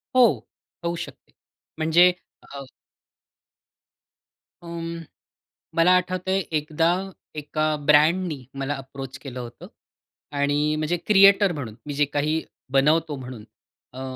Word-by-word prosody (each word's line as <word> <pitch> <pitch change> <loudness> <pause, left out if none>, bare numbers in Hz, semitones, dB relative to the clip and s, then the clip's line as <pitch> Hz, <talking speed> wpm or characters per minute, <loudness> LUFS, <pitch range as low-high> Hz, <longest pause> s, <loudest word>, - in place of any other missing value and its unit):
हो. 245 -3 +4 0.4
होऊ 170 0 -1
शकते. - - -14 0.5
म्हणजे 165 +3 +5 0.3
अ 140 0 -9 2.0
उम्म, 170 -1 -6 0.8
मला 165 +2 +5
आठवतंय 185 +1 -1 0.2
एकदा 155 +2 0 0.5
एका 155 +1 -1
ब्रँडनी 155 -1 +3 0.2
मला 140 +2 -2
अप्रोच 135 0 -8
केलं 130 -2 -8
होतं 120 -1 -9 0.7
आणि 145 +2 +1
म्हणजे 155 +3 -1
क्रिएटर 200 -1 +6
म्हणून 125 -8 -6
मी 145 - -5
जे 145 +1 +2
काही 150 +3 -1 0.3
बनवतो 150 +3 +3
म्हणून 125 -4 -9 0.5
अ, 130 - -8
155 Hz, 105 wpm, -24 LUFS, 140-170 Hz, 2.0 s, क्रिएटर